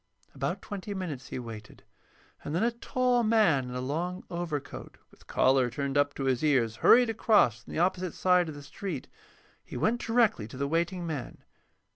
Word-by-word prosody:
About - - -3
twenty 205 0 -6
minutes 165 -9 -5
he - - -6
waited, 115 -3 -9 0.6
and 150 - -4
then 175 - +1
a 235 - +2
tall 245 +1 +1
man 215 - +3
in 125 0 -7
a - - -2
long 170 +8 -3
overcoat, 170 -5 -5
with - - -22
collar 130 -1 +3
turned 140 +2 -3
up 145 0 +2
to 140 - -4
his 130 -1 0
ears, 125 -7 +2
hurried 245 -1 +6
across 200 - +3
from - - -13
the - - -4
opposite 180 0 0
side 180 -2 +3
of 155 - -7
the 145 - -10
street. 155 0 -6 0.6
He - - -8
went 220 - +1
directly 225 - +2
to 120 - -10
the 140 +1 -1
waiting 170 +3 -1
man. 145 -7 -6
160 Hz, 185 wpm, -29 LUFS, 135-195 Hz, 0.6 s, hurried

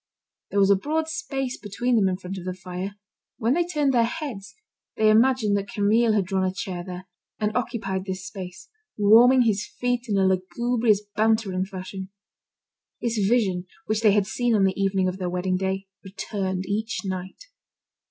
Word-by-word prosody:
There 200 - 0
was 195 0 +5
a - - +7
broad 310 +10 -1
space 270 -5 -3
between 240 +5 -1
them 200 -4 +4
in 185 - -2
front 190 0 -6
of 175 - -10
the 185 -1 -3
fire. 185 +2 -6 0.4
When 230 +3 +1
they 345 +3 +2
turned 300 -5 0
their 235 -2 +4
heads, 245 -7 -6 0.4
they 215 0 +5
imagined 225 -2 +4
that 200 0 -3
Camille 220 +2 +3
had 205 -3 +2
drawn 190 0 0
a 185 - +1
chair 185 -2 -5
there, 185 0 -8 0.3
and 210 -1 -1
occupied 195 -6 -2
this 190 -1 -5
space, 190 -2 -8 0.3
warming 235 +5 +7
his 210 -3 0
feet 245 -1 -2
in 200 - +1
a 190 - +3
lugubrious, 215 +3 +1
bantering 215 -4 +1
fashion. 190 0 -7 0.9
This 230 -2 -1
vision, 195 -4 +1 0.2
which 215 0 0
they 215 -3 +5
had 205 -1 +3
seen 240 +3 0
on 200 - +3
the 190 -1 +3
evening 195 -1 +1
of 185 +1 -3
the 180 -1 -2
wedding 180 +1 -1
day, 190 +1 -2 0.2
returned 190 -1 -3
each 215 +4 -2
night. 185 - -5
200 Hz, 180 wpm, -25 LUFS, 190-230 Hz, 0.9 s, a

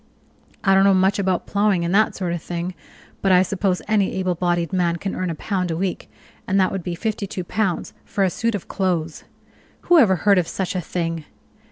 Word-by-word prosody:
I 195 - +4
don't 195 0 +5
know 195 -1 +5
much 190 +2 +2
about 190 -2 0
plowing 200 -4 +1
and 170 - -1
that 215 +2 +3
sort 180 -3 -2
of 170 - -4
thing, 175 +2 -4 0.5
but 195 - +2
I 180 0 +6
suppose 190 0 -1
any 205 -2 +2
able 185 -1 0
bodied 175 0 -1
man 175 -2 +1
can 195 +3 -4
earn 185 -1 -2
a 165 - -3
pound 185 0 -2
a 165 - -2
week, 190 0 -3 0.4
and 195 +1 +2
that 185 - +3
would 195 - -3
be 175 0 -4
fifty 210 +2 -3
two 185 - -5
pounds 190 0 -2
for 200 - -1
a 185 - +2
suit 230 +3 -1
of 200 - -6
clothes. 175 -5 -2 0.6
Who 350 -2 +5
ever 205 -9 +5
heard 200 +2 +4
of 170 - -1
such 190 -1 -3
a 180 - 0
thing! 165 -2 -3
185 Hz, 220 wpm, -22 LUFS, 175-195 Hz, 0.6 s, I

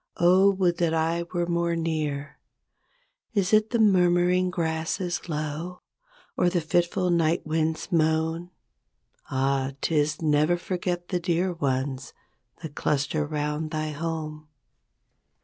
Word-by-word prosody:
0, 185 +3 +5
would 180 -3 +1
that 165 -2 +2
I 165 +1 0
were 175 -1 0
more 170 0 0
near! 155 -3 -3 1.0
Is 195 -1 +1
it 215 0 +4
the 240 - 0
murmuring 180 -3 +4
grasses 170 +1 -2
low. 155 +3 -4 0.5
Or 180 - +3
the 175 0 +1
fitful 175 +3 +1
night 165 -1 +2
wind's 160 +3 -1
moan? 160 +1 +1 0.8
Ah! 135 0 0
'tis 150 -1 +1
"Never 155 +2 +2
forget 175 -1 -3
the 180 - 0
Dear 175 +1 0
Ones 135 -3 -2 0.5
That 155 -3 -6
cluster 150 +1 0
'round 150 +1 -2
thy 155 -1 -2
home". 155 0 -5
165 Hz, 120 wpm, -26 LUFS, 155-175 Hz, 1.0 s, 0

